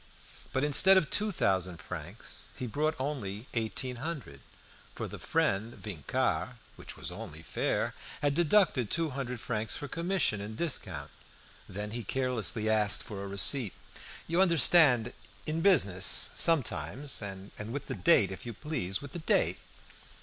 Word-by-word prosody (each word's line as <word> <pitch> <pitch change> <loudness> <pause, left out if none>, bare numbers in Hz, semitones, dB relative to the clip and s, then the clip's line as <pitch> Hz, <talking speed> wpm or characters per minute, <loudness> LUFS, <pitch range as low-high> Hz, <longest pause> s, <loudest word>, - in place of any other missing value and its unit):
But 130 - 0
instead 190 +7 +6
of 170 -6 +1
two 210 0 0
thousand 95 - 0
francs 80 - -5
he 125 - -5
brought 150 +6 -1
only 125 -7 -4
eighteen 120 +2 -1
hundred, 135 - -6 0.6
for - - -4
the - - -8
friend 115 -8 0
Vincart 85 - -2 0.2
(which - - -6
was - - -4
only - - -8
fair) - - -1 0.3
had 145 -1 +1
deducted 165 - +3
two 165 -2 0
hundred 125 -2 -4
francs 110 -2 -2
for 145 - -5
commission 170 - 0
and 110 +2 -7
discount. 90 - -1 0.6
Then 105 +2 -5
he 120 +1 -4
carelessly 110 -3 -1
asked 105 -2 +4
for 100 -2 -6
a - - -5
receipt. 100 +3 +3 0.5
"You 170 +3 +2
understand 150 -8 +5 0.3
in 160 +2 -1
business 100 - +3
sometimes. 145 -3 +1
And 95 -1 -7 0.2
with 145 +2 -4
the - - -4
date, 95 0 +4
if 95 - -7
you 120 - -6
please, 115 - -3
with 145 - -9
the 175 - -4
date." 160 - +2
125 Hz, 150 wpm, -30 LUFS, 100-155 Hz, 0.6 s, instead